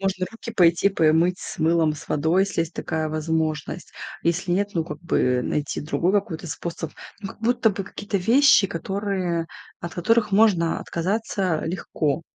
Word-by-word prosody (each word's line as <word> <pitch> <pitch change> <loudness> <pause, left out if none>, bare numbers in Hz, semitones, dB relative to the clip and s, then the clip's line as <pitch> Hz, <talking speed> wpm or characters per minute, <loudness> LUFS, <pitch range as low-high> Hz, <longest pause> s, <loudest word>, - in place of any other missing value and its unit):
Можно 190 -1 -1
руки 230 0 -8
пойти 175 -2 +4
помыть 170 0 +2
с - - -7
мылом, 160 -1 +2
с 155 - -11
водой, 160 +6 +2
если 195 -3 -1
есть 165 0 -2
такая 160 -1 -2
возможность. 155 -1 -2 0.3
Если 175 +2 0
нет, 200 +3 +1
ну, 165 -2 0
как - - -8
бы 125 -7 +1
найти 150 -1 -2
другой 170 +4 0
какой-то 195 -5 -1
способ, 165 0 -5 0.3
ну, 195 - -5
как - - -14
будто 225 -1 +2
бы 200 0 -4
какие-то 205 +2 -4
вещи, 245 +4 +5
которые 185 -1 -2 0.3
от 170 - -6
которых 220 +4 +2
можно 195 -6 +3
отказаться 185 -2 -1
легко. 160 -2 -2
175 Hz, 160 wpm, -23 LUFS, 160-200 Hz, 0.3 s, вещи